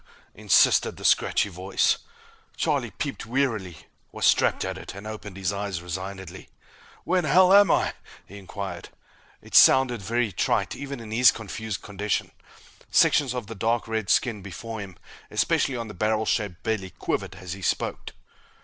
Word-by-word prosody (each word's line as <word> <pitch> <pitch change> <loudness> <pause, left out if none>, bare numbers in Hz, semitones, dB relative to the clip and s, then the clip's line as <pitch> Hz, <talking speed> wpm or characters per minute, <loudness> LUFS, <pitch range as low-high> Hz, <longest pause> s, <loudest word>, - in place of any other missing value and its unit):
_" - - -33 0.3
insisted - - +3
the - - -8
scratchy - - +3
voice. - - 0 0.6
Charlie 140 -7 0
peeped 135 +5 -5
warily, 115 - -2 0.3
was - - +4
trapped - - 0
at 95 0 -3
it, 95 - -9
and 100 +2 -9
opened 105 -3 -8
his 95 -1 -1
eyes 100 -3 -3
resignedly. 95 +2 -7 0.6
"Where'n'ell 180 +1 +4
am 200 -2 +7
I?" - - +2 0.3
he 100 +2 -11
inquired. 95 -2 -7 0.5
It - - -15
sounded 125 -4 +6
very 115 +2 -1
trite, - - 0
even 140 -2 -7
in 110 -1 -9
his 120 +3 +6
confused 110 -1 -6
condition. 105 0 -2 0.6
Sections 135 -4 +3
of 125 -3 -4
the 115 - -8
dark 115 +3 -1
red 110 -3 -3
skin 110 0 +1
before 110 +4 -7
him, 95 -4 -8 0.3
especially 130 -2 +1
on 115 -1 -5
the 105 - -9
barrel 110 +3 0
shaped 100 -6 -2
belly, 110 -4 -2
quivered 95 - -3
as 90 -2 -7
he 95 - -9
spoke. - - -2
110 Hz, 160 wpm, -25 LUFS, 95-120 Hz, 0.6 s, am